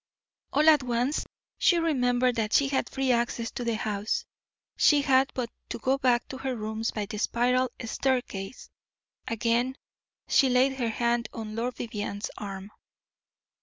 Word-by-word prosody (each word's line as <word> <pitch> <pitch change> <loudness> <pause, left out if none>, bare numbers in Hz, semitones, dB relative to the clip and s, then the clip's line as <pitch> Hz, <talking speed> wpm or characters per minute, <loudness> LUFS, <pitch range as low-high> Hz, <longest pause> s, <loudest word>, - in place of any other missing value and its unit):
All 300 +2 +3
at 305 -3 +7
once 250 +3 -1 0.3
she 350 - +4
remembered 250 -6 +2
that 215 -1 -1
she 280 -1 +4
had 270 - 0
free 265 -1 0
access 235 -1 0
to 245 - -5
the 235 -1 0
house, 215 - -2 0.5
she 290 -2 +4
had 265 -1 +4
but 245 -3 -3 0.2
to - - -3
go 260 +4 0
back 245 -2 +2
to 265 - -7
her 265 -1 -2
rooms 220 0 -3
by 210 -2 -3
the 210 +1 -6
spiral 250 +3 +2 0.2
staircase. 245 -4 -2 0.6
Again 235 +3 0 0.5
she 270 - +4
laid 260 +2 +3
her 235 -2 0
hand 235 0 0
on 215 -1 -6
Lord 240 +2 -2
Vivianne's 205 -2 -4
arm. 195 -1 -7
245 Hz, 155 wpm, -27 LUFS, 225-265 Hz, 0.6 s, at